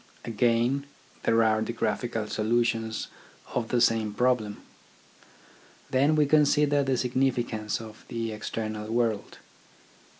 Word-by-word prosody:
Again, 120 +4 +1 0.4
there 115 0 +4
are 110 0 +2
the 115 +2 -2
graphical 115 0 -1
solutions 115 +1 0 0.5
of 120 -2 -1
the 120 - +1
same 110 -3 +2
problem. 120 -4 0 1.3
Then 140 +4 +3
we 150 -1 +4
consider 145 0 +4
the 135 -2 0
significance 120 -4 0
in 110 -1 -9
the 115 -1 -3
external 110 0 -4
world. 115 -3 -1
115 Hz, 110 wpm, -27 LUFS, 110-125 Hz, 1.3 s, there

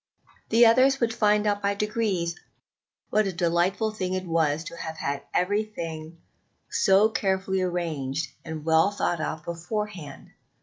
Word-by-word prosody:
The 235 +2 +6
others 260 +4 +5
would 230 -2 +1
find 210 -1 +2
out 205 -1 +1
by 200 0 0
degrees 200 -5 -1 0.8
what 215 -1 +3
a - - -1
delightful 175 +5 +1
thing 185 -3 -3
it 185 0 -3
was 160 -2 +1
to 170 - -8
have 160 -1 -6
had 140 -2 -2
everything 170 -5 -2 0.5
so 195 +2 +4
carefully 190 -3 0
arranged 160 -5 -2
and 160 -2 -7
well 160 +3 +4
thought 175 -5 -1
out 155 - -4
beforehand. 175 -3 -5
185 Hz, 140 wpm, -26 LUFS, 165-210 Hz, 0.8 s, The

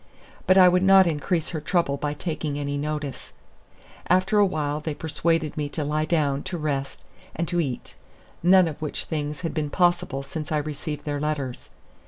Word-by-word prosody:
But 185 - +6
I 185 -1 +9
would 180 0 +4
not 190 0 +7
increase 165 +1 -1
her 160 -3 -4
trouble 170 -6 +1
by 145 +1 -3
taking 155 -2 -3
any 145 0 -2
notice. 150 -1 -4 0.7
After 185 +4 +3
awhile 155 -7 +1
they 155 -1 -4
persuaded 160 0 -1
me 150 -1 -2
to 150 - -3
lie 155 +1 0
down, 145 -4 +1
to 185 -1 -3
rest, 140 -3 -3 0.3
and 170 +1 -2
to 175 +1 0
eat, 135 -7 -3 0.5
none 185 0 +6
of 155 -2 -6
which 150 - -3
things 150 0 -3
had 165 - -3
been 155 -2 -2
possible 175 -6 +1
since 150 +2 -6
I 155 - +2
received 150 0 -4
their 145 -1 -2
letters. 145 -4 -3
155 Hz, 180 wpm, -25 LUFS, 145-170 Hz, 0.7 s, I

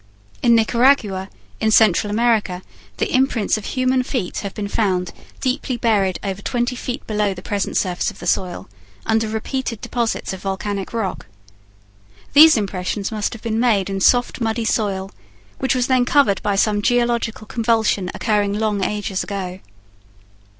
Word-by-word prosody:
In 235 -1 +5
Nicaragua, 225 -4 +2 0.3
in 220 - +1
Central 215 -2 +4
America, 210 -4 +1 0.3
the - - -1
imprints 255 -5 +2
of 215 -2 -5
human 255 0 +1
feet 250 -7 -3
have 200 -2 -6
been 205 -1 -3
found, 185 -4 -1 0.3
deeply 255 -1 -1
buried 200 -6 +1
over 195 0 -4
twenty 245 +3 -1
feet 250 0 -5
below 210 -2 0
the 180 - -10
present 200 -2 -2
surface 180 -2 0
of - - -11
the - - -9
soil, 180 0 -1 0.4
under 220 0 +1
repeated 230 +2 -3
deposits 235 -5 -2
of 190 - -8
volcanic 195 0 -3
rock. 220 -5 -3 1.1
These 310 -1 +8
impressions 195 0 -2
must 215 +1 -2
have 230 - -10
been 225 -1 -1
made 210 -6 +2
in 195 0 -3
soft 245 +3 +3
muddy 225 0 -1
soil 195 -3 -1 0.5
which 265 -1 +1
was 250 -1 +1
then 255 -1 +2
covered 260 -8 +3
by 205 -1 0
some 205 +1 +2
geological 235 -1 0
convulsion 220 -4 0
occurring 205 -1 0
long 210 -2 0
ages 205 -1 -2
ago. 190 -2 -5
215 Hz, 155 wpm, -20 LUFS, 195-240 Hz, 1.1 s, These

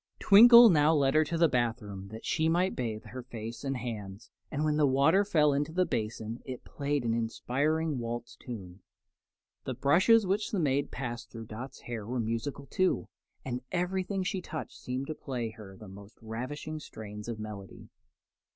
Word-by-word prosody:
Twinkle 235 +2 +9
now 155 0 +4
led 135 -2 +3
her 155 - +5
to 165 +2 -2
the 165 0 +5
bath 120 -3 0
room 100 -3 -8
that 110 +2 -9
she 160 0 +1
might 180 +3 +1
bathe 110 -3 -3
her 130 - -8
face 115 -1 -8
and 135 -1 -2
hands, 105 -5 -7 0.2
and 150 +1 -1
when 150 -1 +2
the 150 -1 +4
water 140 +9 +4
fell 155 -8 +3
into 145 +3 -1
the 185 +2 +2
basin 110 -1 -3
it 130 -2 -7
played 145 -1 -2
an 115 - +1
inspiring 140 +6 -1
waltz 120 0 -5
tune. 95 -7 -9 0.9
The - - -3
brushes 190 +10 +4
which 200 +3 0
the 205 - -1
maid 140 -3 +1
passed 120 -3 -5
through 115 -1 -8
Dot's 120 +5 -8
hair 115 -3 -6
were 125 +1 -2
musical, 115 +5 -3
too, 185 +7 0 0.4
and 125 -1 -3
everything 185 +2 -1
she 185 0 -2
touched 160 - -6
seemed 130 +2 -4
to 155 - -4
play 125 -6 -4
to 110 - -19
her 95 -3 -11
the 105 - -11
most 100 +2 -13
ravishing 130 +8 -5
strains 105 -6 -9
of 115 -2 -4
melody. 105 -3 -9
130 Hz, 185 wpm, -30 LUFS, 115-155 Hz, 0.9 s, Twinkle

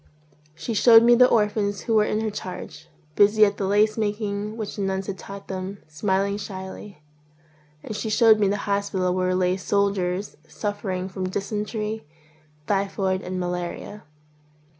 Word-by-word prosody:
She 230 +8 -4
showed 225 +1 +7
me 240 +1 +6
the 250 +1 +7
orphans 210 -2 +1
who 230 - -2
were 215 -1 +4
in 215 +1 -1
her 220 -1 -2
charge, 170 -6 -8 0.3
busy 210 +1 +6
at 200 0 -1
the 195 - -1
lace 210 +2 +2
making 210 0 -2
which 215 -3 -5
the 205 - -4
nuns 190 0 -1
had 195 -1 -5
taught 195 0 -9
them, 190 +1 -5
smiling 195 +5 0
shyly; 190 -3 -8 0.8
and 215 - -6
she 220 - -3
showed 220 0 +5
me 205 - +3
the 200 +1 0
hospital 200 -3 0
where 185 0 0
lay 185 0 +1
soldiers 195 -1 -1
suffering 205 -3 -3
from 185 -1 -4
dysentery, 210 +1 -3 0.6
typhoid, 195 -1 0
and 185 0 -4
malaria. 180 +3 -4
200 Hz, 155 wpm, -24 LUFS, 185-210 Hz, 0.8 s, showed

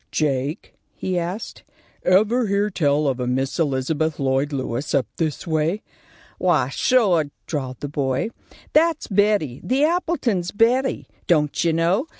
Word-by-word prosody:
"Jake," 145 +2 -1 0.2
he 185 -1 -2
asked, 180 +6 -5 0.4
"ever 215 +6 +3
hear 200 +1 +1
tell 150 -4 +1
of 130 -2 0
a 125 - -2
Miss 130 +5 -1
Elizabeth 155 +2 0
Lloyd 135 +1 +1
Lewis 130 0 -2
up 135 -4 +2
this 160 0 -2
way?" 160 +5 0 0.6
"Wy, - - +2
sure!" 200 - +3 0.2
drawled 130 -5 -4
the 145 - -3
boy. 135 - -1 0.4
"That's 320 0 +3
Betty. 200 - +1
The 265 +3 +1
Appletons' 305 - 0
Betty. 245 +6 +1 0.2
Don't 150 -4 +2
you 165 -1 +2
know? 175 - +1
165 Hz, 140 wpm, -22 LUFS, 140-210 Hz, 0.6 s, ever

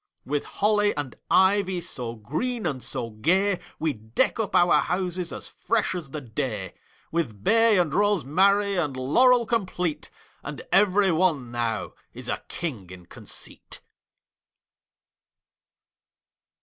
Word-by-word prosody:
With 145 +2 -2
holly 210 0 +1
and 145 -4 -4
ivy 190 -1 +3
So 125 -9 -5
green 195 - -3
and 135 -6 -2
so 115 -1 -3
gay, 180 - +2 0.2
We 160 -2 0
deck 110 - -1
up 215 -4 -2
our 175 0 +5
houses 180 -1 -2
As - - -6
fresh 225 -4 0
as 175 -6 -5
the 155 - -5
day; 110 -6 -4 0.4
With 120 -12 -2
bay 225 - +5
and 170 -6 +1
rosemary 200 +1 +2
And 145 -6 -1
laurel 240 - +4
complete; 180 -8 -2 0.3
And 150 -1 -7
every 195 -1 +4
one 160 -8 +1
now 115 -3 -2 0.2
Is - - -7
a - - -3
king 120 - -5
in 90 -1 -11
conceit. - - -8
170 Hz, 125 wpm, -25 LUFS, 130-200 Hz, 0.4 s, our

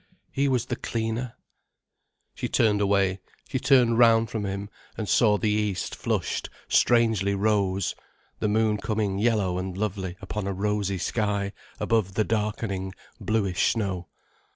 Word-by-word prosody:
He 140 +1 +1
was 125 -4 +1
the - - -3
cleaner. 115 +1 -3 1.0
She - - -3
turned 105 -3 +3
away, 100 -1 +2 0.3
she 130 - -2
turned 120 -4 +4
round 115 -2 +5
from 105 -3 -2
him, 100 +1 -4 0.3
and 110 - -3
saw 105 -1 +4
the 105 0 0
east 105 -3 -1
flushed - - -2 0.2
strangely 110 -5 +3
rose, 100 -2 +1 0.5
the - - 0
moon 110 0 +2
coming 105 -2 -1
yellow 105 -5 +1
and 95 0 -5
lovely 95 -3 -3
upon 100 +1 -4
a 100 - -1
rosy 100 0 -1
sky, 100 0 -1 0.3
above 105 -5 0
the 110 - +3
darkening, 105 -3 -2 0.2
bluish 100 -5 +1
snow. 95 -6 -3
105 Hz, 140 wpm, -26 LUFS, 95-110 Hz, 1.0 s, round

